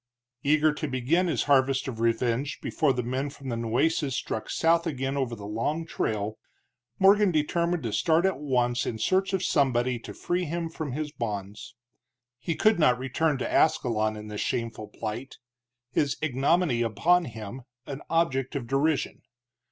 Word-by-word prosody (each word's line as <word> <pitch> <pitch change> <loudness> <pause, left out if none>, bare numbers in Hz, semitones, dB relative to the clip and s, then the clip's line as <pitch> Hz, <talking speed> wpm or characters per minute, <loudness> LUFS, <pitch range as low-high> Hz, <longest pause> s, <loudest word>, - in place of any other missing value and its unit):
Eager 155 +2 +3
to 155 +1 -4
begin 140 +8 +1
his 150 -8 0
harvest 135 -1 +3
of 120 -4 -5
revenge 115 +4 0
before 155 -4 +1
the 125 -1 -1
men 130 +4 -2
from 140 -2 -9
the 120 - -1
Nueces 130 +5 0
struck 110 - -3
south 165 +1 +2
again 135 -2 -2
over 130 -4 -1
the 100 -2 -9
long 115 +10 -2
trail, 110 -8 -2 0.6
Morgan 200 +1 +5
determined 170 +2 0
to 115 -3 -3
start 165 - +3
at 190 -6 +1
once 125 -4 0
in 110 - -2
search 190 - +1
of 190 -1 0
somebody 130 -6 +2
to - - -9
free 180 +1 -1
him 165 +1 -3
from 155 -5 -5
his 150 +1 -3
bonds. 105 -2 -5 0.6
He 160 +6 -2
could 215 0 +3
not 125 -6 +4
return 135 +4 0
to - - -2
Ascalon 110 -8 +2
in 105 0 -8
this 105 -1 -4
shameful 115 -3 -3
plight, 110 +5 -6 0.5
his 140 +1 +1
ignominy 145 -1 +1
upon 165 - +2
him, 115 0 -7 0.2
an 140 +1 -6
object 135 -6 0
of 135 -4 -2
derision. 140 +4 0
135 Hz, 165 wpm, -27 LUFS, 120-160 Hz, 0.6 s, Morgan